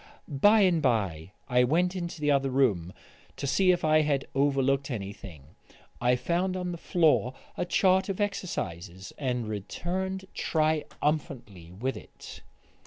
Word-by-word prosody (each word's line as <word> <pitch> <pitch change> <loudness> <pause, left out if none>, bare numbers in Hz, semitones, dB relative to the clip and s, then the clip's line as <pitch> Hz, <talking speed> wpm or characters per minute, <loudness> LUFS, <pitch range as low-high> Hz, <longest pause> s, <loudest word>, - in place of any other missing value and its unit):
By 205 +10 +4
and 180 -4 +3
by 95 - 0 0.2
I 125 -1 +3
went 175 +8 +1
into 170 -3 -5
the 150 0 +2
other 135 -1 +2
room 110 -11 +1 0.5
to - - -4
see 185 +7 +3
if 175 -3 0
I 155 0 +5
had 145 -3 0
overlooked 135 0 +1
anything. 100 - -7 0.6
I 125 +1 +3
found 180 +7 -1
on 180 -1 -3
the 170 - -6
floor 155 -9 +2 0.2
a - - -2
chart 190 +1 +2
of 195 - -3
exercises, 95 - -4
and 125 -5 -2
returned 185 - -4
triumphantly 150 - -2
with 125 +9 -3
it. - - -11
140 Hz, 140 wpm, -28 LUFS, 120-175 Hz, 0.6 s, I